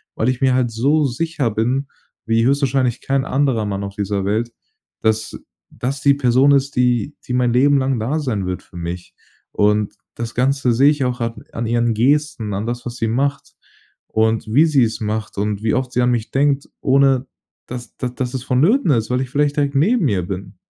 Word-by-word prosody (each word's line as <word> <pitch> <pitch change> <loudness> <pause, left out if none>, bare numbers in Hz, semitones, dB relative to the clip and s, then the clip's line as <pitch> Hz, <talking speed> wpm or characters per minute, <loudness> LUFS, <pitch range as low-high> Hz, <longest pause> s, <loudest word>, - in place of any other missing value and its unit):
weil 115 - +1
ich 130 0 -2
mir 130 -1 +3
halt 125 -2 +1
so 140 +7 +2
sicher 140 0 -1
bin 125 +6 -1 0.4
wie 115 0 +2
höchstwahrscheinlich 135 -2 +1
kein 135 0 0
anderer 130 -6 +1
Mann 100 -1 -3
auf 100 0 -6
dieser 100 -1 -2
Welt, 110 +4 -1 0.5
dass 110 0 -1 0.3
das 135 +3 -4
die 140 0 +5
Person 130 +1 +3
ist, 140 0 +1
die 125 +2 +1
die 125 - -3
mein 125 -1 +2
Leben 140 +3 +4
lang 130 -2 0
da 130 +9 -1
sein 115 -10 -2
wird 90 0 -3
für 90 - -14
mich. 85 +1 -6 0.4
Und 105 0 +1 0.2
das 115 0 -5
Ganze 130 0 +1
sehe 135 +5 +5
ich 145 -2 -1
auch 125 0 -2
an 115 0 -4
an 115 - -3
ihren 120 0 +1
Gesten, 130 -3 +1
an 100 +4 -3
das, 120 0 -4
was 120 -1 -6
sie 115 - -1
macht 140 +5 -2 0.5
und 110 0 0
wie 150 +6 +6
sie 145 -5 +3
es 115 0 -2
macht 110 0 -3
und 105 +1 -2
wie 110 - +1
oft 130 -1 -2
sie 125 - +1
an 125 0 +3
mich 120 -2 -1
denkt, 140 0 +1
ohne 135 -1 +3 0.4
dass 120 -2 -8
da 125 - -2
dass 125 0 -4
es 130 -2 -4
vonnöten 160 - +2
ist, 115 -4 +1
weil 125 +1 +1
ich 130 - -4
vielleicht 145 0 +1
direkt 140 -1 0
neben 180 - +3
ihr 95 -4 0
bin. 95 +1 -7
125 Hz, 205 wpm, -19 LUFS, 110-140 Hz, 0.5 s, wie